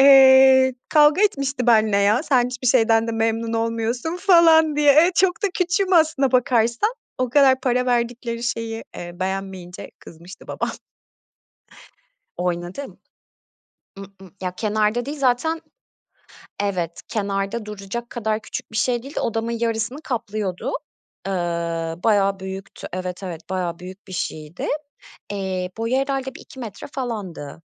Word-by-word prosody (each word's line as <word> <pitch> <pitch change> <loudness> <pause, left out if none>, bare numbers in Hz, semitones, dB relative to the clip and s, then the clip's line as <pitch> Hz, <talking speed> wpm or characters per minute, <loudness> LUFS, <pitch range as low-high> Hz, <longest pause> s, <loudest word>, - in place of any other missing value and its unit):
Eee 265 -1 +7
kavga 300 +4 +5
etmişti 275 - 0
benle 220 -3 +4
ya. 205 +6 +3
"Sen 260 -6 +3
hiçbir 250 +1 -5
şeyden 225 -2 +4
de - - -1
memnun 225 0 -1
olmuyorsun." 230 +7 -1
falan 330 -5 +5
diye. 295 -1 +6
Eee, 335 +5 +5
çok 370 +2 +2
da - - +3
küçüğüm 370 +2 +1
aslına 315 -6 +3
bakarsan. 240 - +2 0.3
O 255 -1 0
kadar 265 -1 +5
para 250 0 +1
verdikleri 235 -1 -1
şeyi, 230 -1 -3
eee, 175 0 -7
beğenmeyince 190 -1 -5
kızmıştı 170 +3 -13
babam. - - -3 1.6
Oynadım. 180 +9 -4 1.0
I - - -8
ı - - -7 0.4
ya 180 -1 -3
kenarda 215 +3 0
değil 290 +2 -5
zaten 275 +5 +1 1.0
Evet, 180 -5 -2
kenarda 200 +1 -2
duracak 210 +3 -6
kadar 220 -2 -2
küçük 220 - -7
bir - - -5
şey 240 +1 +1
değil 275 +4 -10
de - - -1
odamın 225 +1 -2
yarısını 230 +4 -1
kaplıyordu. 215 - -3 0.5
Iıı, 170 -2 -2
bayağı 200 -3 +2
büyüktü. 190 0 -7
Evet, 180 +1 -5
evet. 175 -2 -7
Bayağı 180 -3 -2
büyük 185 +3 -11
bir - - -9
şeydi. 155 -2 -4 0.7
Eee, 190 -2 -3
boyu 230 +3 -1
herhâlde 270 -1 -2
1-2 265 - -13
metre 220 -6 -7
falandı. 205 - -5
230 Hz, 135 wpm, -22 LUFS, 195-265 Hz, 1.6 s, Eee